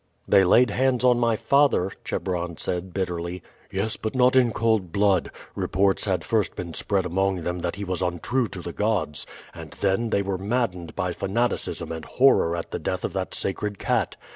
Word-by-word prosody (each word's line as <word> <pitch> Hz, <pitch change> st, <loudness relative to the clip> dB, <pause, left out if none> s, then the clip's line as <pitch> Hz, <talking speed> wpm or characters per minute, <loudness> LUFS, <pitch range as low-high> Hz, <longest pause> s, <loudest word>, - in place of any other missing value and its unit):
"They 95 Hz, -, +6 dB
laid 110 Hz, +5 st, +5 dB
hands 130 Hz, +1 st, +1 dB
on 125 Hz, -1 st, +4 dB
my 115 Hz, -2 st, +2 dB
father," 140 Hz, -7 st, +3 dB
Chebron 85 Hz, -3 st, -3 dB
said 90 Hz, +1 st, -3 dB
bitterly. 90 Hz, -1 st, -3 dB, 0.3 s
"Yes, 100 Hz, +3 st, -2 dB
but 110 Hz, +3 st, -4 dB
not 125 Hz, 0 st, +4 dB
in 125 Hz, -3 st, +5 dB
cold 110 Hz, -6 st, +1 dB
blood. 100 Hz, -2 st, +2 dB, 0.2 s
Reports 95 Hz, 0 st, +1 dB
had 95 Hz, -5 st, 0 dB
first 110 Hz, 0 st, 0 dB
been 85 Hz, -2 st, -6 dB
spread 95 Hz, +1 st, 0 dB
among 95 Hz, +1 st, 0 dB
them 90 Hz, +2 st, -3 dB
that 85 Hz, 0 st, -3 dB
he 100 Hz, -, -5 dB
was 90 Hz, -3 st, -3 dB
untrue 95 Hz, +8 st, 0 dB
to 95 Hz, -3 st, -8 dB
the 85 Hz, -, -6 dB
gods, 105 Hz, -8 st, -1 dB, 0.3 s
and -, -, -9 dB
then 100 Hz, +4 st, +1 dB
they 100 Hz, -2 st, +1 dB
were 95 Hz, -1 st, -2 dB
maddened 100 Hz, -5 st, -2 dB
by 90 Hz, -2 st, -1 dB
fanaticism 110 Hz, +4 st, -1 dB
and 80 Hz, -1 st, -6 dB
horror 125 Hz, -10 st, +3 dB
at 85 Hz, -, -5 dB
the -, -, -3 dB
death -, -, -2 dB
of -, -, -4 dB
that -, -, -3 dB
sacred 100 Hz, +1 st, -2 dB
cat. -, -, 0 dB
95 Hz, 190 wpm, -25 LUFS, 90-115 Hz, 0.3 s, They